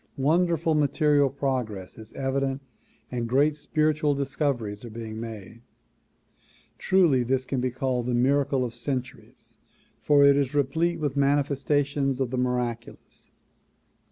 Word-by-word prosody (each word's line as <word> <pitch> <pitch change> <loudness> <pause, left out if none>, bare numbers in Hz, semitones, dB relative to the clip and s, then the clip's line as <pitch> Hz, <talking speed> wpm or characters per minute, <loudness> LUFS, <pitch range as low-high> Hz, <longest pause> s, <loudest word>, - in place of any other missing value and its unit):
Wonderful 165 +3 +2
material 145 -1 +2
progress 125 -8 -3
is 110 -1 -11
evident 135 0 -2 0.5
and 120 -2 -3
great 145 +4 +3
spiritual 150 0 0
discoveries 135 -7 -2
are 120 - -8
being 110 0 -7
made. 115 0 -8 1.2
Truly 170 -9 +3
this 130 +2 0
can 130 -1 -2
be 130 - 0
called 125 -1 -2
the 125 - 0
miracle 135 +1 +2
of 120 - -6
centuries 125 +1 -6 0.4
for 145 -1 +5
it 140 0 +6
is 140 0 0
replete 160 +5 0
with 145 -3 -2
manifestations 140 -1 +1
of 130 -3 -1
the 130 - -2
miraculous. 125 -2 -4
135 Hz, 130 wpm, -26 LUFS, 125-145 Hz, 1.2 s, it